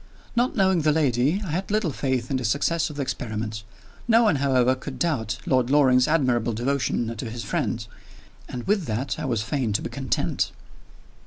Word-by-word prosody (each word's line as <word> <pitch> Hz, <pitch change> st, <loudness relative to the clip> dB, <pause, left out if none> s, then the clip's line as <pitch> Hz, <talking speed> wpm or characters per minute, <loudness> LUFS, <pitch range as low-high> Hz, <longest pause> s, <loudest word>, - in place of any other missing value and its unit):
Not 245 Hz, +2 st, +1 dB
knowing 190 Hz, -4 st, +3 dB
the 155 Hz, 0 st, +3 dB
lady, 145 Hz, -, +1 dB
I 165 Hz, -, -4 dB
had 185 Hz, +5 st, -2 dB
little 210 Hz, -6 st, +1 dB
faith 130 Hz, -2 st, -2 dB
in 135 Hz, -, +1 dB
the 130 Hz, -, -4 dB
success 155 Hz, +8 st, +1 dB
of 150 Hz, -, -9 dB
the 145 Hz, -, -2 dB
experiment. 110 Hz, -4 st, -4 dB, 0.5 s
No 230 Hz, 0 st, +5 dB
one, 210 Hz, -9 st, +3 dB
however, 130 Hz, -2 st, +3 dB
could 130 Hz, 0 st, -7 dB
doubt 120 Hz, -8 st, -1 dB
Lord 130 Hz, -2 st, +2 dB
Loring's 130 Hz, -3 st, +5 dB
admirable 125 Hz, -7 st, +2 dB
devotion 120 Hz, -1 st, -1 dB
to 115 Hz, +1 st, -5 dB
his 120 Hz, +1 st, -6 dB
friend 120 Hz, -, -2 dB, 0.6 s
and 125 Hz, -, -5 dB
with 200 Hz, -3 st, +1 dB
that 115 Hz, +4 st, -2 dB
I -, -, -3 dB
was 115 Hz, -5 st, 0 dB
fain 125 Hz, -2 st, -1 dB
to -, -, 0 dB
be -, -, -5 dB
content. -, -, -1 dB
130 Hz, 185 wpm, -25 LUFS, 120-155 Hz, 0.6 s, No